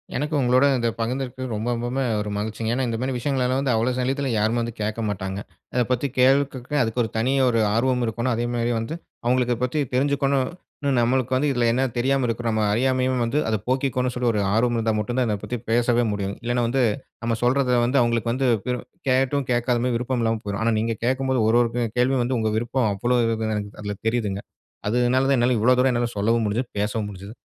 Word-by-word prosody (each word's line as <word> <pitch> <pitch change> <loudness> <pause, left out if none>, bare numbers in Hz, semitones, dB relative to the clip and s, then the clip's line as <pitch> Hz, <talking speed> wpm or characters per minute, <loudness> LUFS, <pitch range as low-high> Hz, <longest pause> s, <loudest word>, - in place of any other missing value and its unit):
எனக்கு 150 +3 -1
உங்களோட 130 +1 +4
இத 120 -1 0
பகிர்ந்துருக்கு 130 +2 -3
ரொம்ப 110 +2 -3
ரொம்பமே 120 +3 -2 0.2
ஒரு 105 - -4
மகிழ்ச்சிங்க. 110 +2 -3
ஏன்னா, 130 0 0
இந்த 115 - -2
மாரி 130 +1 -1
விஷயங்கள்லாம் 130 0 0
வந்து 135 -3 +1
அவ்வளவு 120 +3 0
சல்லியத்துல 135 +2 -1
யாருமே 110 +3 +1
வந்து 115 0 -3
கேக்க 105 +2 -2
மாட்டாங்க. 95 -1 -4 0.3
அத 125 - +2
பத்தி 125 +3 +1
கேள்வி 130 +1 +6 0.2
கேட்க, 130 +3 -6
அதுக்கு 115 +2 -1
ஒரு 110 - -3
தனி 120 +4 +1 0.2
ஒரு 115 - +1 0.2
ஆர்வம் 125 +1 +1
இருக்கோணும். 115 +3 -1
அதேமாரி 120 0 -1
வந்து 115 +7 -4 0.3
அவுங்களுக்கு 125 0 +2
இத - - -11
பத்தி 125 +4 0
தெரிஞ்சுக்கொணும் 140 0 +1 0.4
னு. 140 - +1
நம்மளுக்கு 130 +1 +1
வந்து 145 +3 +2
இதுல 120 -3 +1
என்ன 130 +3 +1
தெரியாம 135 +2 +1
இருக்குறமா, 115 -1 -1
அறியாமயும் 130 +2 +1
வந்து, 135 +6 0
அத 110 - +1
போக்கிக்கணும், 130 -1 0
சொல்லி 125 0 0
ஒரு 105 - -1
ஆர்வம் 120 +2 +2
இருந்தா 115 -1 +1
மட்டும் 120 +4 -3
தான். 125 - +2
இத 105 - 0
பத்தி 125 - -3
பேசவே 120 +1 +3
முடியும். 100 -1 -2
இல்லனா, 120 +1 0
வந்து 130 +2 +1 0.4
நம்ம 115 0 0
சொல்றத 125 0 +2
வந்து 130 +3 +2
அவுங்களுக்கு 115 -1 +1
வந்து, 130 +1 0 0.6
கேட்டும் 135 +2 +2
கேக்காத 120 0 +1
மாரி 125 -1 0
விருப்பம் 125 +1 -2
இல்லாம 115 0 +1
போயிரும். 100 +1 -3
ஆனா, 115 0 +2
நீங்க 115 +1 -1
கேக்கும்போது 130 0 +1
ஒரு 120 - +4
ஒரு 120 - +1
கே 120 - +1
கேள்வியும் 130 0 +2
வந்து 125 0 -1
உங்க 110 -1 0
விருப்பம் 120 0 0
அவ்வளவு 120 +3 +1
இருக்குன்னு, 110 -1 -1
எனக்கு 100 -1 -6
அதுல 105 0 -4
தெரியுதுங்க. 105 -4 -1 0.5
அது 115 - +1 0.2
னால 130 +1 +3
தான், 140 - +4
என்னால 120 0 +2
இவ்ளோ 125 +3 +5
தூரம் 130 +1 +4
என்னால 120 0 0
சொல்லவும் 115 +3 +2
முடிஞ்சுது, 120 +4 -2
பேசவும் 105 +1 -1
முடிஞ்சுது. 100 +3 -10
120 Hz, 205 wpm, -23 LUFS, 115-130 Hz, 0.6 s, கேள்வி